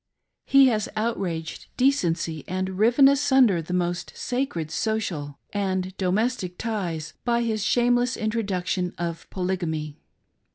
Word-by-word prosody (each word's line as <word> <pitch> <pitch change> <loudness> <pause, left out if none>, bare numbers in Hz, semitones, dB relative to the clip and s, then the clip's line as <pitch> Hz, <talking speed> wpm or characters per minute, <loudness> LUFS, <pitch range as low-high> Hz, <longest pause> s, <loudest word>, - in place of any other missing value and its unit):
He 275 0 +7
has 215 -3 -1
outraged 185 -8 -3
decency 170 - +1
and 185 +1 -3
riven 240 +5 +6
asunder 265 -9 +4
the 160 - -8
most 175 0 -2
sacred 245 - -2
social 175 -10 -2 0.2
and 190 -2 -1
domestic 190 0 -1
ties 175 -9 -3
by 235 -1 +1
his 220 -3 -1
shameless 245 +2 +2
introduction 195 -5 -1
of 170 -1 -4
Polygamy. 165 -5 -3
190 Hz, 115 wpm, -25 LUFS, 175-235 Hz, 0.2 s, He